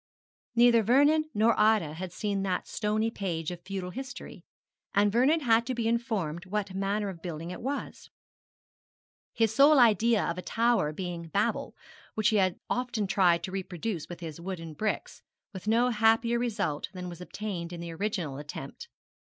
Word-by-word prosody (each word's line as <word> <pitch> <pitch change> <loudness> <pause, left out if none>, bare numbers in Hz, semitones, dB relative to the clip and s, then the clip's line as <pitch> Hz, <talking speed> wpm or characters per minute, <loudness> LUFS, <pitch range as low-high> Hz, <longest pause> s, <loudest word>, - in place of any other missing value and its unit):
Neither 235 -1 +6
Vernon 290 +8 +4
nor 225 0 +3
Ida 210 -8 +3
had 180 +2 -6
seen 200 +1 -2
that 185 -2 -2
stony 215 +1 0
page 175 -6 -3
of 175 -1 -7
feudal 185 -1 -5
history, 260 +3 -8 0.5
and 205 0 +4
Vernon 265 +9 +3
had 230 -3 +4
to 255 - -1
be 230 -1 -1
informed 210 -8 -1
what 200 0 -2
manner 200 +2 -1
of 180 -4 -7
building 165 -1 -5
it - - -7
was, 280 +3 -5 1.2
his 225 -1 +1
sole 285 +4 +6
idea 230 -2 +4
of 170 +2 -2
a - - -3
tower 225 -7 +1
being 170 0 -5
Babel, 200 +6 -1 0.4
which 215 +1 +3
he 215 - +2
had 185 -2 +1
often 245 -4 -1
tried 180 -3 +3
to 185 - -4
reproduce 185 -1 -4
with 175 0 -8
his 165 -1 -7
wooden 170 -3 -6
bricks, 215 +8 -3 0.3
with 190 +1 -8
no 235 +3 +3
happier 225 +2 +3
result 205 -11 -2
than 180 -1 -6
was 175 0 -8
obtained 180 -3 -5
in 175 - -6
the 170 0 -6
original 165 -6 -3
attempt. 150 - -8
200 Hz, 165 wpm, -29 LUFS, 175-230 Hz, 1.2 s, Neither